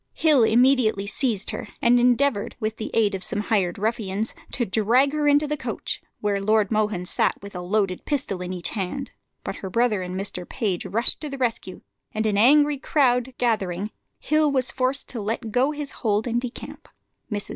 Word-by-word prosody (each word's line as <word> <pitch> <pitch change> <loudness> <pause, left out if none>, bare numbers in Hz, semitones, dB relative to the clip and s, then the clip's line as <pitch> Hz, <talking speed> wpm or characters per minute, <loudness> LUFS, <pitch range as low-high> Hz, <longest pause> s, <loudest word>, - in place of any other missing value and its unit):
Hill 305 -6 +4
immediately 230 -3 +3
seized 215 -1 0
her, - - -6
and 245 +1 +4
endeavoured, 245 -2 +2
with 220 -1 -3
the 220 - -4
aid 215 -2 +3
of 190 -1 -3
some 210 - +1
hired 200 -5 0
ruffians, 215 0 -1 0.2
to 240 - 0
drag 230 +7 +2
her 300 -1 0
into 290 +1 +4
the 300 - -1
coach, 290 - -4 0.2
where 205 -1 0
Lord 215 0 +2
Mohun 210 -4 0
sat - - 0
with 200 - -9
a 180 - -5
loaded 190 0 -1
pistol 260 -11 -2
in 180 0 -4
each 180 -2 -3
hand; 215 +7 -4 0.3
but - - -5
her 190 - -6
brother 225 -1 +1
and 180 0 -5
Mr. 180 -2 -4
Page 200 -8 -2
rushing 230 +4 +1
to 305 - -5
the 275 - -6
rescue, 230 -7 -3 0.3
and 215 +1 0
an 210 -2 +1
angry 290 +6 +5
crowd 255 -4 +1
gathering, 210 -4 -1 0.3
Hill 305 0 +2
was 260 -2 0
forced 260 +2 0
to 235 - -3
let 220 +2 -3
go 255 +5 +2
his 295 -1 -4
hold 215 -2 -1
and 240 0 0
decamp. 250 -1 -8 0.4
Mrs. 205 -1 -3
225 Hz, 190 wpm, -24 LUFS, 200-260 Hz, 0.4 s, angry